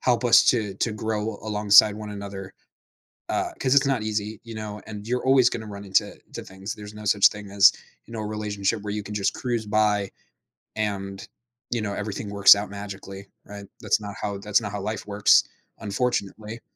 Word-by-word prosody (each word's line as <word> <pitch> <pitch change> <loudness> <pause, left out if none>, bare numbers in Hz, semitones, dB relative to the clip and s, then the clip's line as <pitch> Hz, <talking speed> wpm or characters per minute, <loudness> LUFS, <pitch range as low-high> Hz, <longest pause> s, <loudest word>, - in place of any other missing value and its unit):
help 125 -1 +1
us 120 - +7
to 110 -5 +1
to 110 +3 -1
grow 110 0 -3
alongside 105 -1 +5
one 105 -1 -7
another, 100 -1 -8 0.8
uh, - - -1
'cause 130 0 +2
it's 140 0 +4
not 135 -5 0
easy, 105 0 -3
you 115 -1 -9
know, 105 -1 -6
and 105 -1 -8
you're 125 +1 -1
always 130 -2 +5
gonna 110 -1 -5
run 100 -1 -8
into 95 - 0 0.2
to - - -7
things. 95 +2 -7
There's 105 0 -11
no 105 0 -10
such 100 0 +5
thing 105 -1 -10
as, 100 0 +6 0.3
you 115 - -14
know, 110 - -5
a 105 - -4
relationship 105 -1 -2
where 105 -1 -4
you 105 - -3
can 105 +1 -8
just 100 -2 0
cruise 120 -3 -3
by 105 -2 +1 0.7
and, 100 -2 -4 0.4
you 120 -2 -1
know, 100 -1 -3
everything 105 0 -5
works 100 0 +7
out 100 +1 -4
magically, 100 -1 -8 0.2
right? 100 0 -10 0.2
That's - - +1
not 100 -1 -7
how 100 -1 -3
that's 105 +2 +1
not 105 -2 -5
how 100 -1 -5
life 105 +1 -4
works, 100 0 +4 0.4
unfortunately. 110 +1 -3
105 Hz, 195 wpm, -24 LUFS, 100-110 Hz, 0.8 s, us